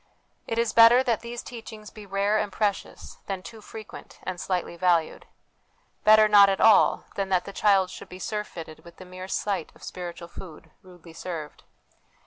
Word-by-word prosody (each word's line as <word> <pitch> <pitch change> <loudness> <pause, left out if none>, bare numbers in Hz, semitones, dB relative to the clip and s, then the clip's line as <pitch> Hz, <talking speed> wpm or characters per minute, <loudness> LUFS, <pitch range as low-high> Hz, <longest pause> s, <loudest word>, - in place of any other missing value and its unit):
It 225 - -3
is 230 -1 0
better 230 +3 +7
that 235 -5 0
these 235 +1 -7
teachings 220 -3 -10
be 210 -2 -12
rare 200 +2 +1
and 205 - -2
precious, 205 0 -3
than 190 -2 -4
too 225 0 -11
frequent 220 0 -11
and 180 -1 -5
slightly 180 -2 -2
valued; 170 -2 0 0.8
better 215 0 +7
not 205 -1 +7
at 195 - -1
all, 220 -2 +5
than 195 -1 -3
that 185 -2 +1
the 200 - -8
child 195 -3 +3
should - - -10
be 180 - -9
surfeited 185 -6 -6
with 170 - -15
the 185 - -11
mere 185 +1 -9
sight 195 -3 -2
of - - -18
spiritual 175 -1 -7
food, 165 -3 -12
rudely 175 -3 -15
served. 160 -3 -7
195 Hz, 175 wpm, -26 LUFS, 180-215 Hz, 0.8 s, better